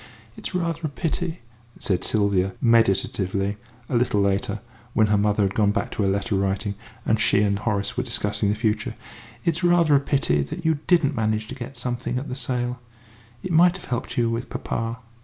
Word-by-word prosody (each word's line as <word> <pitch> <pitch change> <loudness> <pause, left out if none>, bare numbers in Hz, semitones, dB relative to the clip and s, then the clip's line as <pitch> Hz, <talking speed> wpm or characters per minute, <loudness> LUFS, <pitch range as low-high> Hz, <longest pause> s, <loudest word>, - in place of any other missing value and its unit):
"It's - - -6
rather 170 -2 -1
a - - -5
pity," 165 +3 -3 0.4
said 95 -3 -1
Sylvia, 100 -3 +1
meditatively, 100 -3 +2 0.3
a - - -2
little 120 -3 +2
later, 100 +1 0 0.3
when 110 - +4
her - - +4
mother 105 0 +2
had 95 0 +1
gone 105 -1 +3
back 110 - -2
to - - -2
her 100 - +2
letter 100 +3 -1
writing, 100 +1 0 0.3
and 110 - +2
she 100 -1 +3
and 100 -1 +1
Horace 100 -3 -1
were 125 - +1
discussing 105 -4 0
the 105 - +1
future; 110 +1 -1 0.5
"it's 170 +1 0
rather 175 -3 +4
a - - +6
pity 135 - +1
that 115 - -6
you 160 -2 +2
didn't 160 -5 +4
manage 110 -1 0
to - - -5
get 125 0 -8
something 125 0 -2
at 135 +4 -3
that 125 - -3
sale. 125 -1 -2 0.6
It 185 - -4
might 175 +3 +5
have 185 - -12
helped 120 0 -3
you 115 -1 +2
with 115 +2 -3
papa." 115 +1 -3
115 Hz, 195 wpm, -24 LUFS, 100-135 Hz, 0.6 s, a